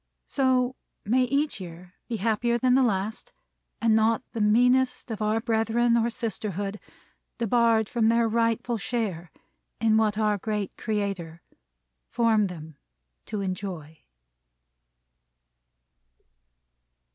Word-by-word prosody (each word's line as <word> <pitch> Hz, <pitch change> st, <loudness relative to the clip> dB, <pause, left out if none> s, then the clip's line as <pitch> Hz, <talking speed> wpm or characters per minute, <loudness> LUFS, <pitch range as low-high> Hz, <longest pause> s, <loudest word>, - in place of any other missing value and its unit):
So 260 Hz, -2 st, +1 dB, 0.3 s
may 250 Hz, +5 st, +3 dB
each 280 Hz, -3 st, -1 dB
year 180 Hz, 0 st, -10 dB, 0.2 s
be 230 Hz, -, -2 dB
happier 230 Hz, +3 st, +1 dB
than 250 Hz, +1 st, +2 dB
the 265 Hz, -, +5 dB
last, 220 Hz, -, -1 dB, 0.5 s
and 230 Hz, -1 st, +3 dB
not 220 Hz, +2 st, +2 dB
the 230 Hz, -, -2 dB
meanest 250 Hz, +4 st, +3 dB
of 220 Hz, -1 st, -5 dB
our 215 Hz, +1 st, +1 dB
brethren 230 Hz, +1 st, +1 dB
or 235 Hz, 0 st, +2 dB
sisterhood 210 Hz, -4 st, -4 dB, 0.6 s
debarred 230 Hz, -1 st, +3 dB
their 230 Hz, 0 st, +3 dB
rightful 230 Hz, +1 st, 0 dB
share 195 Hz, -7 st, -3 dB, 0.5 s
in 220 Hz, -1 st, +3 dB
what 215 Hz, -2 st, +2 dB
our 210 Hz, -2 st, +1 dB
great 210 Hz, -1 st, -3 dB
Creator 195 Hz, -7 st, -3 dB, 0.7 s
formed 220 Hz, -4 st, +2 dB
them 160 Hz, -4 st, -10 dB, 0.5 s
to 210 Hz, -, -3 dB
enjoy. 180 Hz, -5 st, -5 dB
220 Hz, 110 wpm, -26 LUFS, 200-235 Hz, 0.7 s, the